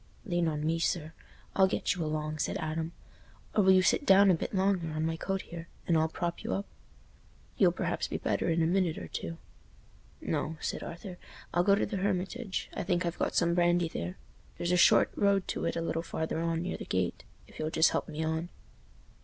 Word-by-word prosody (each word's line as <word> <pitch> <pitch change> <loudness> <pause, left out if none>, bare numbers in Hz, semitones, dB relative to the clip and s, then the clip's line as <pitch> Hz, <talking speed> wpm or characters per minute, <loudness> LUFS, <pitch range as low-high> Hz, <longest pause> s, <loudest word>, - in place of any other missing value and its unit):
"Lean 175 -4 +1
on 150 -1 -1
me, 165 +1 +1
sir; 160 -1 -1 0.4
I'll 190 -1 +6
get 190 - 0
you 180 -3 -3
along," 155 0 -2
said - - -1
Adam. 160 +1 -3 0.6
"Or, 215 - +4
will 190 - +6
you 185 0 +6
sit 185 - +3
down 195 -5 +7
a - - +5
bit 165 - -2
longer, 190 -4 +1
on 155 0 -2
my 165 0 0
coat 195 +3 -2
here, 170 -1 -8 0.2
and 170 - +3
I'll 160 0 +3
prop 170 +1 -3
y' - - -5
up. 200 - -1 0.9
You'll - - +5
perhaps - - -2
be - - -3
better - - 0
in 165 0 +2
a - - +3
minute 175 -1 +1
or 85 - -6
two." 85 0 -5 0.8
"No," 160 +1 -2
said - - -3
Arthur. 175 +1 -8 0.3
"I'll 175 - +3
go 200 +1 +5
to 200 - +1
the 205 - -3
Hermitage—I 195 +3 -2
think 175 0 0
I've 170 0 -3
got - - 0
some 170 -1 +3
brandy 175 -1 +3
there. 90 - -5 0.4
There's 175 - -1
a - - +4
short 175 - +6
road 200 -2 +2
to - - -2
it - - -1
a 165 - -1
little 165 0 -1
farther 160 -1 -3
on, 165 0 0
near 185 - -3
the - - -7
gate. 95 -2 -1 0.2
If - - -15
you'll 155 - -1
just 160 +1 +4
help - - -2
me 155 +1 -3
on." 160 +2 -2
170 Hz, 215 wpm, -30 LUFS, 160-185 Hz, 0.9 s, down